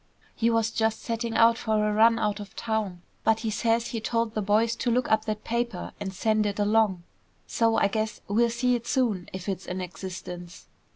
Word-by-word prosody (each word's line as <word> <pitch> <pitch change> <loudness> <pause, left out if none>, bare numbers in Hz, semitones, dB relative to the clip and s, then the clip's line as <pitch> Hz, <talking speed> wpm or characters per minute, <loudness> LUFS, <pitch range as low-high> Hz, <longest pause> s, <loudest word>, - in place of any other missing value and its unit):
"He 230 - +1
was 230 -1 +1
just 220 -1 0
setting 230 0 -3
out 230 0 +5
for 215 -1 +1
a 210 - 0
run 225 +2 +5
out 210 -1 -1
of 205 -1 -9
town, 215 -6 -2 0.2
but 225 0 +2
he 225 - -1
says 230 +2 +1
he 230 - -4
told 230 0 -1
the 215 - -1
boys 215 +3 +2
to 245 - -1
look 245 +1 +1
up 220 0 +3
that 215 -1 -3
paper 235 -5 -2
and 190 - -4
send 215 +2 +1
it 205 - -3
along. 205 -3 +2 0.4
So, 225 -1 +1
I - - +4
guess 215 +2 -2
we'll 235 +4 +3
see 250 +2 +1
it 235 -1 -2
soon, 225 -10 0
if 185 +1 -7
it's 190 -2 -3
in 180 +1 -3
existence." 180 -1 -7
220 Hz, 210 wpm, -27 LUFS, 205-230 Hz, 0.4 s, out